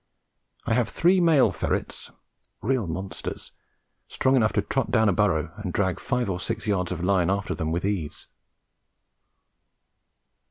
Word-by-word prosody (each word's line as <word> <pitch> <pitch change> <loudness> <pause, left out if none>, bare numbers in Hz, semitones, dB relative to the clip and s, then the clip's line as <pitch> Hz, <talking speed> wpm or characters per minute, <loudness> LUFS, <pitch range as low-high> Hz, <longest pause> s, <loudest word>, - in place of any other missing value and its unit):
I - - +1
have 120 -1 +1
three 180 +2 +3
male 160 -5 +5
ferrets, - - -3 0.5
real 120 -4 0
monsters, 95 +4 -6 0.6
strong 130 0 +1
enough 110 -5 +3
to - - +1
trot - - -1
down 110 0 +3
a - - +2
burrow 85 -5 +1
and 105 -4 -4
drag 95 0 0
five 125 -2 -1
or 90 -2 -2
six 115 +2 -4
yards 95 -4 0
of 90 -1 -4
line 90 -2 +2
after 100 +1 -1
them 80 0 -3
with 85 +3 -1
ease. 95 -7 -3
100 Hz, 150 wpm, -25 LUFS, 90-115 Hz, 0.6 s, male